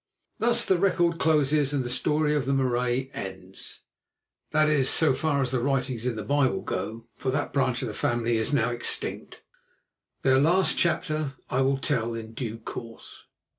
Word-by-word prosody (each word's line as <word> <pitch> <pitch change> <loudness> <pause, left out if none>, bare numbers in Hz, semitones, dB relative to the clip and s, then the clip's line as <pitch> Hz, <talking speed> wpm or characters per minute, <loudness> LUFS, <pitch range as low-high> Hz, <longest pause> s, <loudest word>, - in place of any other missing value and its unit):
Thus 235 +1 +2
the 185 -2 +2
record 175 -3 +2
closes 150 -2 +2
and 140 -3 0
the 120 - -5
story 150 +4 +1
of 145 -4 -1
the 140 - +1
Marais 125 0 0
ends—that 95 +10 -5
is, 145 -4 +3
so 155 -5 +4
far 140 0 0
as 125 - -2
the 130 - 0
writings 130 -2 -1
in 125 - -1
the 110 - -5
Bible 140 -2 +1
go, 110 +5 -4
for 130 - -3
that 140 +2 -2
branch 130 -2 +1
of - - -2
the 105 - -5
family 120 0 0
is 110 +4 0
now 120 -4 +2
extinct. 120 0 -3 0.8
Their 130 0 +4
last 175 +6 +3
chapter 155 -4 0 0.2
I 130 - +1
will 135 +1 +2
tell 120 -4 -1
in 115 0 -7
due 115 -2 -5
course. 115 0 -9
135 Hz, 170 wpm, -26 LUFS, 120-150 Hz, 0.8 s, so